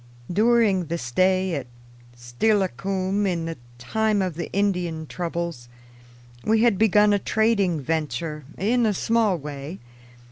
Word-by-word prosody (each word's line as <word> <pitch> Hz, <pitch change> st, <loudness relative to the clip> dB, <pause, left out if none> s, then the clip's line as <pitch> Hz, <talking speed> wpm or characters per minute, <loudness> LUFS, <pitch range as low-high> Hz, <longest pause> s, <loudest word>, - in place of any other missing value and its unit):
During 215 Hz, -3 st, +3 dB
the 170 Hz, +2 st, -3 dB
stay 185 Hz, +7 st, +1 dB
at 135 Hz, -5 st, -3 dB, 0.5 s
Steilacoom 195 Hz, -, 0 dB
in 170 Hz, -3 st, -1 dB
the 165 Hz, 0 st, -4 dB, 0.2 s
time 215 Hz, -, 0 dB
of 185 Hz, -2 st, -2 dB
the 165 Hz, +1 st, -6 dB
Indian 180 Hz, -5 st, -1 dB
troubles, 170 Hz, -7 st, -4 dB, 0.7 s
we 220 Hz, +1 st, +3 dB
had 230 Hz, -5 st, +3 dB
begun 210 Hz, -1 st, +5 dB
a 205 Hz, -, +2 dB
trading 200 Hz, -6 st, +1 dB
venture, 155 Hz, +1 st, -3 dB
in 230 Hz, +4 st, +2 dB
a 210 Hz, -, 0 dB
small 225 Hz, -4 st, +2 dB
way. 145 Hz, +3 st, -7 dB
185 Hz, 130 wpm, -24 LUFS, 165-210 Hz, 0.7 s, begun